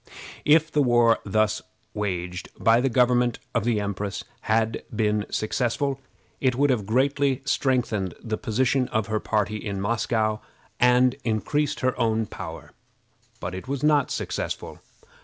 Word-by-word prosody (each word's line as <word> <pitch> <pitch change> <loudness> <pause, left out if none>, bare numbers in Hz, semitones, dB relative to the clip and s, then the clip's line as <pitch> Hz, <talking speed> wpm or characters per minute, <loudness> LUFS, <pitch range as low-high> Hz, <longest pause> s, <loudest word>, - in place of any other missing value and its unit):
If 155 +2 +4
the 150 - +2
war 120 -3 +4
thus 105 +1 +1 0.3
waged 90 -3 -3
by 115 +1 +4
the 135 - +2
government 125 0 +3 0.2
of 115 -3 0
the 115 -3 +2
empress 100 0 -3 0.3
had 110 0 +1
been 105 -1 +1
successful, 130 +5 -1 0.4
it 130 -2 +2
would 140 +2 +3
have 105 -6 -1
greatly 135 +3 +1
strengthened 120 -8 0
the 110 -2 -3
position 130 +2 +1
of 110 -1 -1
her 110 0 -1
party 105 0 0
in 100 -2 -4
Moscow, 110 +1 0 0.4
and 125 0 +5
increased 130 +6 -1
her 130 0 +1
own 110 -1 +1
power; 85 -5 -8 0.7
but 90 +1 -5
it 95 +6 -7
was 140 0 -3
not 150 -3 +3
successful. - - -4
115 Hz, 140 wpm, -25 LUFS, 105-130 Hz, 0.7 s, and